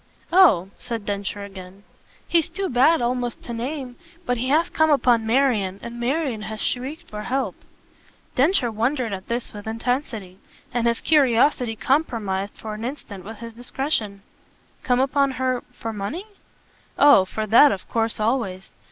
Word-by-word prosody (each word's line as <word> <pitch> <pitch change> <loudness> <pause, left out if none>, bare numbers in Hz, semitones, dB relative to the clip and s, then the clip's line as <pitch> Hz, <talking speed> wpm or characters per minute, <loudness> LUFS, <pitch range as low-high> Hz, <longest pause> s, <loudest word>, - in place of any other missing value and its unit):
"Oh!" 250 - +6
said 230 -4 -5
Densher 200 0 -3
again. 190 0 -11 0.4
"He's 335 -3 +2
too 390 -1 -3
bad 265 +4 +4
almost 245 -1 -2
to 240 - -6
name, 250 +1 -5 0.3
but 245 - 0
he 255 +3 -2
has 320 +4 +3
come 315 0 +3
upon 245 -6 +3
Marian, 220 -6 +2
and 235 0 -7
Marian 255 -2 -1
has 215 +1 -6
shrieked 285 +10 -3
for 210 0 -6
help." 265 +4 -1 0.8
Densher 270 -3 +3
wondered 235 +1 -1
at 190 -1 -6
this 235 +1 -3
with 205 0 -9
intensity; 225 -5 -3 0.3
and 235 -1 +1
his 235 0 0
curiosity 255 -4 +3
compromised 220 -8 -1
for 215 -1 -6
an 215 +1 -7
instant 230 -7 -6
with 220 +3 -9
his 230 -1 -7
discretion. 235 -4 -3 0.6
"Come 250 -1 +1
upon 275 +1 +2
her 255 0 -1
for 225 -1 -6
money?" 215 - -4 0.7
"Oh 285 -9 +7
for 215 +3 -4
that 235 +7 +7
of 190 - -5
course 225 -1 -1
always. 215 -5 -1
235 Hz, 155 wpm, -23 LUFS, 215-270 Hz, 0.8 s, Oh